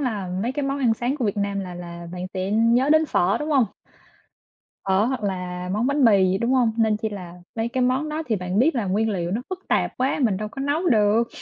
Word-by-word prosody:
là 215 -9 -2
mấy 245 - -1
cái 290 +2 -3
món 275 +1 -1
ăn 240 -4 +2
sáng 245 +5 -2
của 260 - -2
Việt 205 -2 -1
Nam 200 -1 -1
là 180 -2 -6
là 170 -1 -8
bạn 180 0 -5
sẽ 185 +1 -2
nhớ 230 +6 +3
đến 315 0 +4
phở, 185 -5 +2
đúng 300 - -3
hông? 270 -5 +4 1.2
Phở 190 +2 +3
hoặc 255 -1 -2
là 180 -2 -3
món 215 +5 0
bánh 280 -1 +2
mì 200 -4 +5
gì, 190 - 0
đúng 235 +4 0
hông? 245 -4 +3
Nên 220 -2 +2
chi 220 +1 -3
là 180 -4 -8 0.2
mấy 225 0 -1
cái 255 +1 -1
món 260 +5 +1
đó 305 +1 -3
thì 225 - 0
bạn 180 +1 -2
biết 280 +7 +3
là 235 -5 -1
nguyên 210 +4 +1
liệu 175 -4 -2
nó 225 +6 -2
phức 375 0 -7
tạp - - 0
quá, 260 +4 0
mình 215 -6 +2
đâu 210 +2 -4
có 270 - -8
nấu 295 +6 0
được. 220 0 +3
225 Hz, 260 wpm, -23 LUFS, 195-260 Hz, 1.2 s, mì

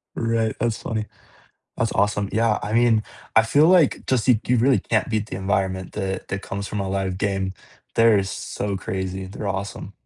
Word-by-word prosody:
Right, 115 -1 0
that's 115 -2 -1
funny. 110 -2 -3 0.7
That's 115 - 0
awesome. 105 -1 +1
Yeah, 110 -1 +2
I 105 - -4
mean, 115 -1 +4 0.3
I 110 - +8
feel 140 +8 +4
like 175 -6 +4
just 130 -4 +1
you 120 -4 +5
you 125 - +3
really 125 0 +4
can't 110 0 0
beat 110 -2 -1
the - - -5
environment 95 -1 -1
that 95 -2 -4
that 95 +1 -3
comes 100 +1 -5
from 105 - -3
a 95 - -2
live 95 -1 -2
game. 95 -1 -1 0.4
They're 115 -3 +5
so 100 +1 -4
crazy, 95 0 -4
they're 100 +2 -5
awesome. 100 +1 -4
105 Hz, 185 wpm, -23 LUFS, 95-115 Hz, 0.7 s, I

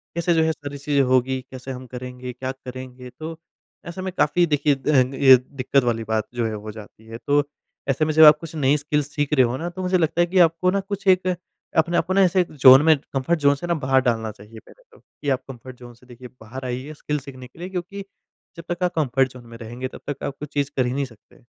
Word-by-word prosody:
कैसे 170 0 +1
जो 160 -1 +3
है, 160 - +2
सारी 145 -2 -7
चीज़ें 140 0 +1
होंगी? 130 +1 +1
कैसे 130 0 -7
हम 130 0 -8
करेंगे? 125 0 -7
क्या 130 +2 -4
करेंगे? 130 -1 -10
तो 155 +6 -8 0.5
ऐसे 170 +2 -6
में 185 0 -4
काफ़ी, 175 +4 +3
देखिए, 150 -2 +1
दंग 135 -1 +1
ए 130 -1 +8
दिक्कत 130 +1 -1
वाली 115 -2 -1
बात 110 -1 -2
जो 120 -1 0
है, 110 - -4
हो 105 0 -7
जाती 110 +1 -13
है। 115 0 -8
तो 145 0 +3 0.5
ऐसे 135 +3 +1
में 155 - -1
जब 160 +1 +7
आप 150 0 +9
कुछ 165 0 -9
नई 145 -1 +2
स्किल्स 150 0 -1
सीख 145 0 -1
रहे 130 -3 +5
हो 120 +2 -2
ना, 170 +4 -4
तो 180 +2 -8
मुझे 185 0 +1
लगता 165 0 +1
है 175 - +3
कि 185 +2 +1
आपको 165 +3 -1
ना, 200 - +1
कुछ 195 0 -6
एक, 185 -1 +4 0.5
अपने 170 +2 +2
आप - - +1
को 185 - 0
ना, 195 - +4
ऐसे 185 0 +3
एक 175 - -4
ज़ोन 130 -2 +8
में 160 -1 +5 0.2
कम्फ़र्ट 140 +5 0
ज़ोन 140 -1 +4
से 160 +5 -7
ना, 170 - +1
बाहर 130 0 +4
डालना 115 -3 -1
चाहिए 105 +2 -14
पहले - - -20
तो, 460 - -19
कि 145 - -8
आप 130 -1 0
कम्फ़र्ट 130 -1 -10
ज़ोन 120 -1 -12
से, 120 +2 -22
देखिए, 125 0 -12
बाहर 130 +4 -8
आइए, 130 +4 -5
स्किल्स 150 -1 -4
सीखने 130 -2 -10
के 130 - -21
लिए 180 +2 -6
क्योंकि 190 +2 -5 0.5
जब 170 - -8
तक 175 +1 -2
आप 180 0 +1
कम्फ़र्ट 135 -4 +1
ज़ोन 125 -1 -13
में 115 0 -11
रहेंगे, 120 +3 -6
तब - - -12
तक 145 - -5
आप 140 - -3
कुछ 150 -1 -8
चीज़ 145 -1 -1
कर 130 - +2
ही 125 - -2
नहीं 140 +1 -1
सकते। 115 -5 -19
140 Hz, 260 wpm, -22 LUFS, 125-160 Hz, 0.5 s, आप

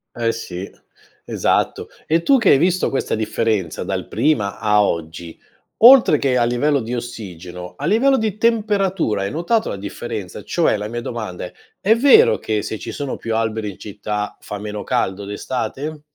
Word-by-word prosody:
Eh 115 -1 0
sì, 95 -4 -6 0.6
esatto, - - 0 0.2
e 165 +2 +2
tu 275 +6 +5
che 220 - +3
hai - - +7
visto 180 +4 +1
questa 135 - -2
differenza 110 -5 -1
dal - - -3
prima 105 -11 0
a 105 -1 +3
oggi, 85 -2 -4 0.4
oltre 240 - +8
che 135 -3 +1
a 120 - +3
livello 125 +5 +1
di 115 +2 -4
ossigeno, 90 -7 -8
a - - -4
livello 265 +6 +3
di 215 -3 -2
temperatura 200 - +1
hai 100 - -2
notato 215 +8 0
la - - -3
differenza? 100 -1 -6
Cioè, - - +1
la 105 +1 -4
mia 120 +2 -5
domanda 110 -8 -5
è: - - -10 0.3
è 215 +3 +4
vero 440 - +6
che 105 -2 -2
se 110 0 -5
ci - - -6
sono 140 -2 -4
più 115 -1 -3
alberi 110 -1 -1
in 95 - -15
città, 105 0 -4
fa 105 - -7
meno 105 0 -6
caldo 95 +1 -1
d'estate? 130 +8 -4
115 Hz, 175 wpm, -20 LUFS, 105-170 Hz, 0.6 s, oltre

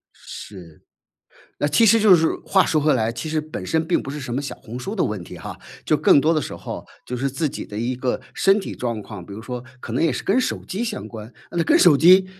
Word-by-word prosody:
是， 85 -6 -11 0.8
那 - - +1
其 230 +9 +4
实 225 +2 +6
就 210 -3 +7
是 160 -1 +2 0.2
话 190 -1 +4
说 155 - +2
回 150 +1 +3
来， 115 -2 0
其 120 +6 -5
实 155 0 0
本 155 -11 -7
身 160 +10 0
并 175 - +1
不 135 - -6
是 145 - -5
什 125 -3 -5
么 135 - -1
小 140 - -5
红 120 +3 -9
书 195 - -5
的 185 - +2
问 105 -4 -3
题 - - -10
哈。 - - -8 0.3
就 - - +3
更 - - +5
多 160 +3 +3
的 155 - +2
时 - - -6
候， - - -7 0.2
就 125 - -4
是 135 +3 -1
自 150 +4 -1
己 - - -6
的 105 - -7
一 120 +3 -1
个 125 0 -2
身 195 +1 +4
体 - - -6
状 115 -3 -3
况， 100 -4 -9
比 100 - -11
如 105 - -7
说 125 +1 -6 0.2
可 115 - -7
能 125 - 0
也 165 -3 +3
是 125 - -4
跟 215 +7 +3
手 255 - -2
机 195 +4 -4
相 220 -3 -4
关， 110 0 -9 0.2
呃， 175 - -4
那 - - +4
跟 - - +4
手 175 -6 +7
机 185 +5 +7
140 Hz, 290 characters per minute, -22 LUFS, 115-170 Hz, 0.8 s, 就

